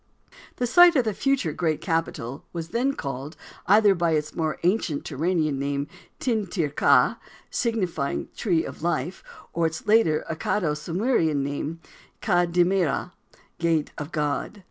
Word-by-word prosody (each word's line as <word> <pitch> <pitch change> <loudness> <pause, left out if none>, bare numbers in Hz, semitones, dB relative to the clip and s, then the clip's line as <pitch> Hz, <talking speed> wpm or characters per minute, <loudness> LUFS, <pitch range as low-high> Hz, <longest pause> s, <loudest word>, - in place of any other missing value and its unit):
The 250 - -1
site 345 +7 +7
of 260 - +4
the 215 - 0
future 265 - 0
great 160 -2 0
capital 160 - -2
was 165 -1 -5
then 250 +8 0
called 140 +3 -5 0.3
either 205 0 +6
by 170 -3 +1
its 150 0 -1
more 155 -2 -1
ancient 175 -5 +1
Turanian 155 -1 0
name, 140 0 -1 0.3
"Tin 220 -5 -1
Tir 170 -4 -1
ki," 140 - +3 0.3
signifying 190 - -1
The - - -35
Tree 170 -7 +1
of - - -8
Life, 170 0 -2 0.3
or 165 -1 +2
its 160 0 -6
later 210 -8 +3
Accado 160 0 -1
Sumerian 165 - 0
name, 145 +4 -4 0.4
"Ka 175 -4 +2
Dimmirra," 175 0 +1 0.5
Gate 165 -3 +1
of 150 +2 -6
God. 150 +7 -2
165 Hz, 145 wpm, -25 LUFS, 150-200 Hz, 0.5 s, site